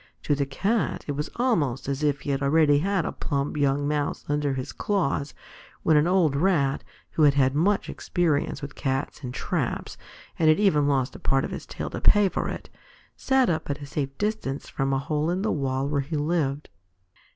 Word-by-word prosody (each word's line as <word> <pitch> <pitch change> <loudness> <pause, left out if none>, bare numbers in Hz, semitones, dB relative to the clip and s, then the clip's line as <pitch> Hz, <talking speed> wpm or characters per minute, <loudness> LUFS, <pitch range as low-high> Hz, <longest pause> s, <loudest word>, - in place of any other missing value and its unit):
To 145 - +1
the 140 -1 0
Cat 200 +11 -1
it - - -1
was 145 +1 -3
almost 155 - 0
as 140 +1 -2
if 145 -2 +1
he 140 - -2
already 145 +1 +3
had 190 +1 0
a - - -2
plump 140 -1 -2
young 145 0 +1
Mouse 150 -1 -2
under 145 -2 0
his 130 +1 -4
claws, 150 -8 -1 0.5
when 160 - +4
an 150 +2 +4
old 175 -6 +3
Rat, 145 -4 +1 0.3
who - - -1
had 145 -2 +6
had 135 -1 +3
much 190 +8 +1
experience 160 -6 -1
with 140 -1 -6
Cats 135 0 -3
and 125 - -4
traps, - - -3 0.4
and 160 -2 +4
had 155 - +4
even 155 -9 +3
lost 135 -3 0
a - - -9
part 135 0 +1
of - - -6
his - - -6
tail - - -5
to - - -5
pay 205 -2 +5
for - - -2
it, - - -6 0.5
sat 265 -2 +2
up 160 -3 -1
at 140 0 -2
a 145 - -7
safe 140 -1 -4
distance 205 -10 -2
from 135 0 -2
a 135 - +2
hole 150 +3 -1
in 185 +3 -1
the 220 - +1
wall 135 -1 -1
where 145 -1 0
he 150 +3 -4
lived. 150 -2 -1
145 Hz, 205 wpm, -25 LUFS, 140-165 Hz, 0.5 s, had